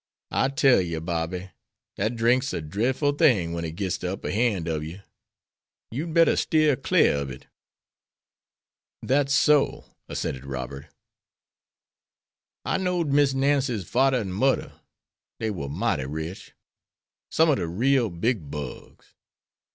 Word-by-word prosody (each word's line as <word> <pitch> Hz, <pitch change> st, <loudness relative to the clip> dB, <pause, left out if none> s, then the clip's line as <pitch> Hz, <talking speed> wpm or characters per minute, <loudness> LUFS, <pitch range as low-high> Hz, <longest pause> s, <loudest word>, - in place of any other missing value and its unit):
I -, -, +2 dB
tell 135 Hz, -5 st, +4 dB
you, 85 Hz, -3 st, -3 dB
Bobby, 85 Hz, +3 st, -3 dB, 0.4 s
dat 110 Hz, +4 st, -1 dB
drink's 120 Hz, +4 st, +2 dB
a -, -, -1 dB
drefful 130 Hz, -, 0 dB
thing 105 Hz, -, +3 dB
wen 85 Hz, 0 st, -3 dB
it 80 Hz, -1 st, -5 dB
gits 95 Hz, -2 st, -2 dB
de 90 Hz, -, -3 dB
upper 95 Hz, -, -4 dB
han' 105 Hz, -6 st, 0 dB
ob 80 Hz, -2 st, -1 dB
you. 80 Hz, +6 st, -8 dB, 0.9 s
You'd 155 Hz, +8 st, -4 dB
better 165 Hz, 0 st, +4 dB
steer 155 Hz, -3 st, +3 dB
clar 75 Hz, -, +3 dB
ob 70 Hz, -1 st, -4 dB
it." 65 Hz, 0 st, -10 dB, 1.6 s
"That's 140 Hz, +1 st, +1 dB
so," 140 Hz, +1 st, +2 dB, 0.2 s
assented 65 Hz, -1 st, -3 dB
Robert. 70 Hz, +1 st, -6 dB, 1.8 s
"I -, -, 0 dB
know'd 180 Hz, -4 st, 0 dB
Miss 140 Hz, -2 st, +3 dB
Nancy's 135 Hz, -, +1 dB
fadder 135 Hz, +1 st, +3 dB
and 100 Hz, -6 st, -3 dB
mudder. 130 Hz, +7 st, +1 dB, 0.7 s
Dey 110 Hz, -1 st, -1 dB
war 70 Hz, -8 st, -5 dB
mighty 65 Hz, -1 st, -1 dB
rich. 80 Hz, +6 st, -6 dB, 0.8 s
Some 160 Hz, 0 st, +4 dB
ob -, -, +2 dB
de 90 Hz, -4 st, -2 dB
real 120 Hz, +7 st, +2 dB
big 85 Hz, -, -2 dB
bugs. 75 Hz, -3 st, -8 dB
110 Hz, 135 wpm, -25 LUFS, 85-135 Hz, 1.8 s, tell